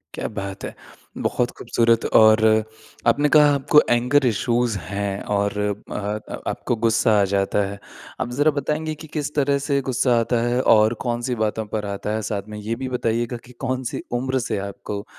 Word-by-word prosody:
क्या - - -3
बात 100 -1 -5
है! - - -6 0.5
बहुत 125 0 0
खूबसूरत 115 -1 +1
और 110 0 +7 0.7
आपने 145 +6 +3
कहा 150 -1 +6
आपको 145 +2 +5
एंगर 125 +4 +3
इशूज़ 120 -1 +1
हैं 100 +3 -4
और 100 +1 0 0.3
अ, 105 +1 -4
आपको 120 - -2
गुस्सा 115 0 +3
आ - - +4
जाता 100 +1 +1
है। 100 0 -8 0.4
अब 120 - -3
ज़रा 150 +1 +5
बताएँगे 150 +2 -2
कि - - -9
किस 145 0 -3
तरह 140 -1 +2
से 140 -1 +2
गुस्सा 125 -1 +2
आता 115 0 0
है? 125 +1 +1
और 110 -1 +5
कौन-सी 120 +1 -1
बातों 110 +1 -2
पर 105 -1 -2
आता 100 +1 -4
है? 110 - -2
साथ 100 0 -3
में 105 - -7
ये 110 +2 -3
भी 130 - -3
बताएगा 120 +1 -1
कि 125 - -15
कौन 130 0 -1
सी - - -4 0.2
उम्र 130 +1 -1
से 110 - -1
आपको 100 +1 -6
120 Hz, 180 wpm, -22 LUFS, 105-130 Hz, 0.7 s, और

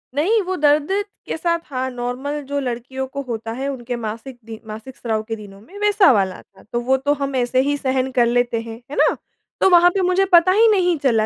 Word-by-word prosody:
नहीं, 405 +10 +2
वो 370 +1 -3
दर्द 295 0 +2 0.3
के - - -3
साथ 335 0 0
हाँ, 260 -2 -3
नॉर्मल 250 +4 -4
जो 285 0 -2
लड़कियों 260 +1 -4
को 280 +1 -5
होता 225 -1 -4
है, 265 +4 -4
उनके 245 -2 -4
मासिक 230 +3 -6
दि 225 -1 -8
मासिक 220 +5 -9
स्राव 220 -2 -2
के 225 - -3
दिनों 200 -2 -12
में 375 - -14
वैसा 415 -5 +5
वाला 190 -4 0
था, - - -22
तो 240 - -3
वो 265 +2 +2
तो 285 +2 +1
हम 275 -1 -2
ऐसे 250 +1 +1
ही 285 +1 0
सहन 260 -1 -1
कर 240 - +5
लेते 240 -1 +1
हैं, 230 -1 -8 0.2
है - - -5
ना? - - +3 0.5
तो - - +5
वहाँ 350 -1 +7
पे 390 - +2
मुझे 370 +1 +2
पता 345 +1 +7
ही 440 +4 +5
नहीं 360 -4 +2
चला 225 -5 +3
265 Hz, 230 wpm, -20 LUFS, 235-315 Hz, 0.5 s, वहाँ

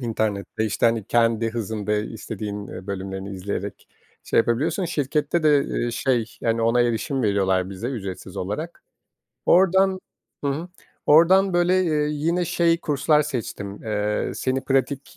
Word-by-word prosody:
internette, 110 -3 -2
işte, 110 +2 +1
hani, 115 -3 +1
kendi 115 -1 +2
hızında 110 -2 -3
istediğin, 105 -1 -5
eee, 95 +1 -9
bölümlerini 95 0 -5
izleyerek 100 +1 -5 0.4
şey - - +1
yapabiliyorsun. 145 - +1
Şirkette 150 0 0
de, 145 -2 +4
iii, 120 0 -2
şey, 120 -1 +1 0.2
yani, 115 0 0
ona 115 +2 +3
erişim 120 +3 0
veriyorlar 95 -3 +1
bize 100 +5 -5
ücretsiz 95 -7 -6
olarak. 130 - -4 0.6
Oradan. 190 +1 +4 0.4
Hı 140 - +1
hı. 160 +6 -4 0.4
Oradan, 185 +5 +6
böyle, 180 +2 +3
eee, 150 -3 +1
yine 165 +4 0
şey 170 0 +2
kurslar 150 +1 +2
seçtim, 110 -8 -5
eee, 105 -1 -1
seni 130 0 -1
pratik 135 +1 -1
120 Hz, 140 wpm, -23 LUFS, 105-150 Hz, 0.6 s, Oradan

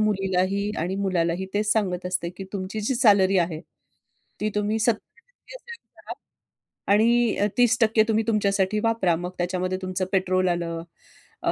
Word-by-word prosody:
मुलीलाही 195 -1 0
आणि 175 +4 -2
मुलालाही 185 -2 -1
तेच 210 0 +2
सांगत 185 -5 -1
असते 180 -1 -2
की 195 - -7
तुमची 200 +2 -4
जी 220 +5 -1
सॅलरी 200 -6 +4
आहे 165 -2 -1 0.8
ती 215 - 0
तुम्ही 210 +1 0
70% 240 - -4
सेव्ह 470 -1 -13
करा - - -8 0.8
आणि 235 +2 +3
अ, 205 - +2
30% 230 -2 +4
तुम्ही 220 0 +2
तुमच्यासाठी 205 -2 +1
वापरा. 225 -7 +2
मग 175 +2 -5
त्याच्यामध्ये 185 +1 -2
तुमचं 185 0 -2
पेट्रोल 185 -1 +1
आलं. 165 -1 -3 0.6
अ, - - +2
195 Hz, 145 wpm, -24 LUFS, 185-215 Hz, 0.8 s, सॅलरी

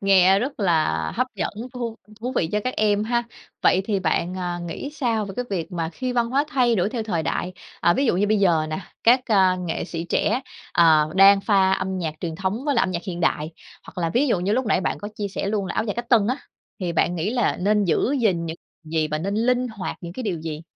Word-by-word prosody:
Nghe 195 -1 +5
rất 260 +3 -4
là 170 -5 +3 0.3
hấp - - +1
dẫn, - - -2 0.2
thú 235 -2 -4 0.2
thú 250 +3 -3
vị 160 - +1
cho 210 - +1
các 255 - -1
em 210 -1 +2
ha. 240 +1 +1 0.4
Vậy 190 - +4
thì 200 -2 0
bạn, 170 +1 0
à, 175 -1 -3
nghĩ 280 +11 -5
sao 235 -8 -1
về 195 - -7
cái 250 - -1
việc 180 -2 -3
mà 165 -2 -2
khi 255 +8 -4
văn 235 -1 0
hóa 275 +3 +2
thay 250 -5 +2
đổi 190 -2 +1
theo 230 0 -3
thời 180 -7 -1
đại, 180 +3 -2 0.3
à, 175 - +4
ví 275 - +1
dụ 200 - +2
như 200 +3 +2
bây 215 +1 +2
giờ 170 -5 +3
nè, 155 - -2 0.3
các, 245 +3 +6
à, 190 -5 +4
nghệ 165 - -2
sĩ 165 -1 -5
trẻ, 220 +7 +1 0.3
ờ, 155 -2 +5
đang 195 +1 +7
pha 195 -2 +3
âm 190 0 -1
nhạc 160 -4 -3
truyền 165 -2 -3
thống 190 +8 -2
với 290 -2 +1
lại 235 - +3
âm - - 0
nhạc 170 -1 -3
hiện 175 -2 -4
đại, 155 -2 0 0.4
hoặc - - -10
là 165 - 0
ví 265 +5 +3
dụ 200 -7 +1
như 190 +3 0
lúc 255 +2 0
nãy 195 - +2
bạn - - -2
có 205 - -6
chia 205 -2 -3
sẻ 195 - -4
luôn 200 -1 -1
là - - -4
áo - - 0
dài 205 - -2
cách 240 0 -5
tân 225 -5 +4
á, 250 +4 0 0.4
thì 175 -2 -2
bạn 170 +1 +1
nghĩ 175 +4 -1
là 240 -2 +1
nên 205 +2 +2
giữ 185 - +1
gìn 180 -7 +1
những 160 0 -5 0.3
gì 155 0 -1
và 155 0 -2
nên 195 +5 -2
linh 250 +3 +1
hoạt 210 -5 -5
những 170 -1 -7
cái 255 - -6
điều 185 -8 -2
gì? 155 -1 -5
195 Hz, 260 wpm, -23 LUFS, 175-230 Hz, 0.4 s, đang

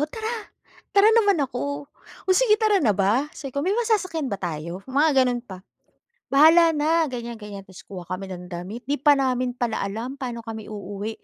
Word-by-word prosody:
tara."Tara 435 0 -1
naman 410 -4 +4
ako. 285 +3 -4 0.4
"O 375 - +3
sige 430 +1 +4
tara 425 -3 +2
na 210 -8 +2
ba?" 220 +9 +2
sabi 275 -2 -7
ko, 280 - -1
"May 380 +8 0
masasakyan 370 - 0
ba 200 - -4
tayo?" 170 +1 -5
Mga 290 +4 +3
ganun 245 -1 -2
pa. 190 -5 -10 0.7
"Bahala 325 +4 +7
na," 320 +2 +2
ganyan 235 -1 -5
ganyan, 205 -3 -10
tapos 190 - -13
kuha 185 -3 -9
kami 190 +1 -5
ng 180 0 -8
damit. 190 +8 -7
Di 290 - +1
pa 285 +1 +4
namin 255 -2 0
pala 240 -4 -2
alam 225 +7 -4
paano 245 -4 -5
kami 220 -2 -8
uuwi 205 +1 -6
255 Hz, 180 wpm, -24 LUFS, 205-320 Hz, 0.7 s, Bahala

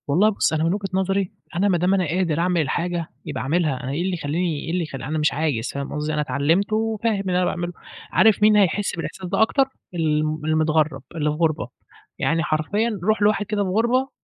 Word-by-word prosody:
والله 180 +9 +4
بُصّ، 200 - 0
أنا 155 0 +1
من 165 +2 +2
وجهة 200 -1 -2
نظري، 190 0 0 0.2
أنا 190 +4 +2
ما 185 -3 +3
دام 180 +3 +2
أنا 190 -2 +2
قادر 165 -1 0
أعمل 175 -1 +2
الحاجة 170 +3 -2 0.2
يبقى - - -4
أعملها، 150 -3 0
أنا 130 - -3
إيه 145 +5 -2
اللي 185 +1 -1
يخلّيني 165 0 -1
إيه 165 - -3
اللي 175 0 0
يخ 155 - -7
أنا 135 +4 -3
مش 150 - +2
عايز 145 -7 -1
فاهم 140 0 -4
قصدي؟ 150 +1 -2
أنا 150 - 0
اتعلّمت 150 +9 +1
وفاهم 220 -1 0
اللي 190 -2 -2
أنا 180 - +2
باعمله، 175 0 -2 0.4
عارف 220 -1 +4
مين 215 0 +6
هيحس 200 0 +2
بالإحساس 185 +2 -6
ده 195 +4 0
أكتر؟ 270 +5 +4 0.3
الم 155 -2 0
المتغرّب، 155 -2 +1
اللي 150 -2 0
في - - -3
غربة، 155 -5 0 0.5
يعني 165 0 +1
حرفيًا 200 +9 0
رُوح 215 +2 +1
لواحد 205 0 +3
كده 205 0 -1
في 190 - -2
غربة، 235 +7 +1
175 Hz, 215 wpm, -23 LUFS, 155-200 Hz, 0.5 s, مين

